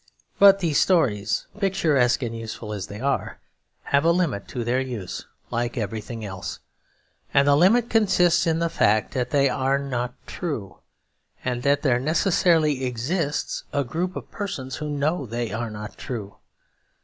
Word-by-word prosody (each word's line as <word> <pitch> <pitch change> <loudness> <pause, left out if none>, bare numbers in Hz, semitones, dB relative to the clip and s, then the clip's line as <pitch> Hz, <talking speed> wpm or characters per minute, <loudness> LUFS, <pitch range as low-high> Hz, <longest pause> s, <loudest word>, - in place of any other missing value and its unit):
But 195 0 +7
these 160 -5 +2
stories, 110 - +2
picturesque 150 - +2
and 115 -1 -3
useful 110 -1 -6
as 100 -2 -5
they 105 - -8
are, 140 +3 -1 0.5
have 140 +1 +2
a 165 - +4
limit 170 - 0
to 120 - -4
their 120 +3 +1
use 120 -8 -5 0.2
like 120 +1 -2
everything 110 +1 -4
else; 95 -2 -6 0.8
and 140 0 +5
the 145 - +6
limit 210 +10 +4
consists 190 -7 +3
in 165 -1 +2
the 170 0 +1
fact 110 -9 +2
that 125 -1 -1
they 140 -1 +3
are 135 +1 +1
not 125 -3 -3
true, 120 - -5 0.7
and 125 -1 -1
that 140 +2 +2
there 125 -4 +3
necessarily 155 -1 +2
exists 140 +6 -2
a 140 - +1
group 170 +9 -3
of - - -7
persons 135 -11 -5
who 150 0 -4
know 145 0 -1
they 115 0 -3
are 115 +2 -3
not 105 0 -8
true. 110 -7 -6
135 Hz, 160 wpm, -24 LUFS, 115-165 Hz, 0.8 s, But